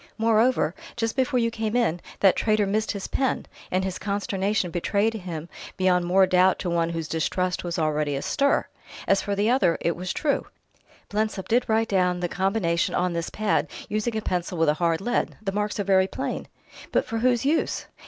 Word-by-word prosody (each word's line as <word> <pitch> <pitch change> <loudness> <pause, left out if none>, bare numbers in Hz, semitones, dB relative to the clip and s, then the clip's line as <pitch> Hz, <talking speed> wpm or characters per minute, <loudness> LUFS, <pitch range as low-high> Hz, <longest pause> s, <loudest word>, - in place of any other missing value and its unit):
Moreover, 225 -5 +3 0.2
just 225 -1 -1
before 260 -1 +1
you 230 -1 +1
came 220 0 -2
in, 180 -9 +1 0.2
that 195 -2 +6
traitor 215 -2 +2
missed 215 +2 0
his 200 -2 -5
pen, 265 -1 -1 0.2
and 185 +1 0
his 190 -1 -3
consternation 200 -1 -1
betrayed 200 +6 +1
him 175 -6 -6 0.3
beyond 180 -1 +2
more 190 +2 +5
doubt 185 0 +4
to 175 - -3
one 170 -1 +1
whose 165 -2 -3
distrust 180 +3 -1
was 175 0 -3
already 150 -2 0
astir. 280 - +1 0.4
As 195 - +3
for 200 - -2
the 210 +4 +2
other, 185 -10 +3
it 170 - 0
was 180 +1 -4
true: 290 -2 0 0.6
Blensop 210 -2 -2
did 245 +2 +2
write 225 +1 +2
down 180 -2 +2
the 175 - -1
combination 190 -2 0
on 180 0 +1
this 170 0 -2
pad, 215 -1 0 0.2
using 215 +2 -1
a - - -1
pencil 180 0 -2
with 165 -1 +3
a - - +4
hard 165 0 +2
lead; 240 +4 -1
the 200 -3 -3
marks 210 +1 -2
are - - +1
very 190 -1 +3
plain." - - -4 0.4
"But - - +2
for 225 - -3
whose 245 +1 +2
use?" 305 +3 0
195 Hz, 190 wpm, -25 LUFS, 175-220 Hz, 0.6 s, that